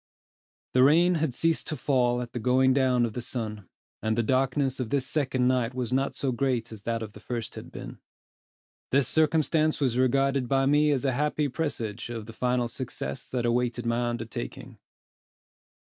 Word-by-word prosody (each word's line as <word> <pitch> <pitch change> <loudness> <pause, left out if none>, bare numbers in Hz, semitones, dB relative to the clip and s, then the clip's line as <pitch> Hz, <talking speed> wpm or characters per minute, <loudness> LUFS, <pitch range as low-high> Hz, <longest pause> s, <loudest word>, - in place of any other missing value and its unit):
The 125 - +4
rain 165 +7 +5
had 145 -6 0
ceased 165 +2 0
to 155 - -2
fall 125 -2 +1
at 120 - -11
the 120 - -3
going 130 +3 +3
down 130 -3 +3
of 115 - -4
the 125 - -4
sun; 110 -6 -5 0.3
and 110 +1 0
the 120 - +2
darkness 130 +2 +1
of 125 -4 -2
this 135 0 0
second 130 -3 0
night 125 -1 +1
was 125 -1 -2
not 135 +1 0
so 135 - -1
great 120 -2 -1
as 110 -2 -9
that 115 +1 -2
of 105 -2 -8
the - - -12
first 115 +1 -5
had - - -9
been. - - -8 0.9
This 140 0 +3
circumstance 155 0 +2
was 125 -4 +1
regarded 135 0 +2
by 135 0 +3
me 150 +2 +4
as 140 -2 +1
a 135 - +3
happy 150 +2 0
presage 120 -7 -3
of 115 -3 -5
the 115 - -10
final 125 +1 0
success 125 +2 -6
that 125 -2 -1
awaited 120 0 0
my 120 +1 0
undertaking. 115 - -6
125 Hz, 185 wpm, -27 LUFS, 120-135 Hz, 0.9 s, rain